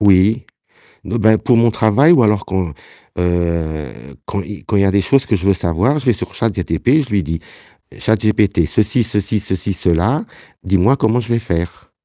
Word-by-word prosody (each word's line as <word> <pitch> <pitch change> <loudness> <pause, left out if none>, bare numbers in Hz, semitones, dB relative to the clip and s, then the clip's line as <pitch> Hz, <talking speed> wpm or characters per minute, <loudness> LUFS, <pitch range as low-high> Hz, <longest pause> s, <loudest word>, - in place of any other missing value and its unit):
Oui. 100 +4 +3 0.6
Non, 105 - -3
ben, 110 -1 +4
pour 120 +1 +2
mon 115 0 +4
travail 110 +9 +3
ou 145 - +5
alors 105 -2 +1
quand, 95 -4 -2 0.5
heu 85 -5 -1 0.3
quand 100 - -3
il 105 -2 -10
quand 105 - -1
il 100 - +3
y - - +3
a 95 - +3
des 100 - +2
choses 135 +7 +2
que 110 - +1
je 95 0 -4
veux 100 - +5
savoir, 95 - 0
je 135 - -7
vais 120 - +5
sur - - -7
ChatGPT, 115 - 0
je 125 - -14
lui 100 -2 +1
dis: 80 +2 -4 0.6
«ChatGPT 105 -5 +1
ceci, 110 +7 +1
ceci, 105 -1 -2
ceci, 100 0 -3
cela, 85 -2 0 0.4
dis-moi 95 +7 +2
comment 115 0 +1
je 115 - -7
vais 115 - +2
faire». 85 -5 -4
105 Hz, 195 wpm, -17 LUFS, 90-115 Hz, 0.6 s, ou